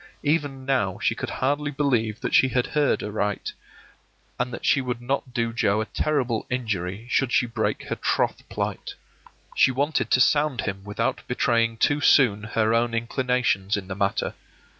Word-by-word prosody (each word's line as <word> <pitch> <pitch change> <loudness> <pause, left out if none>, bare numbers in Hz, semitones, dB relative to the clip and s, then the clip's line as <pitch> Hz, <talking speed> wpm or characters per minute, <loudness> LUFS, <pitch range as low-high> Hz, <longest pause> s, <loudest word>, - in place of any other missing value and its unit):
Even 145 -3 -1
now 125 -9 0
she - - +1
could - - -5
hardly 145 +2 -1
believe 125 -7 0
that - - -3
she 130 - +6
had 125 -1 0
heard 150 -2 +1
aright, 105 -1 -2 0.9
and 125 0 -1
that 120 - -6
she 140 - +3
would 125 -2 -3
not 130 +1 -2
do 115 -1 -1
Joe 105 -2 +1
a 110 - -1
terrible 130 -4 -1
injury 105 -4 -3
should 135 -3 +1
she 125 - +3
break 115 - -2
her - - -3
troth - - -1
plight. - - -4 0.6
She - - +5
wanted 140 +4 0
to - - +4
sound 145 0 +3
him 95 -1 -4
without 105 +3 -2
betraying 115 -2 +1
too 145 +5 +2
soon 120 -8 +5
her 110 +1 0
own 115 0 +1
inclinations 115 -4 0
in 95 -2 -6
the 95 - -5
matter. 100 0 -1
120 Hz, 170 wpm, -24 LUFS, 110-135 Hz, 0.9 s, she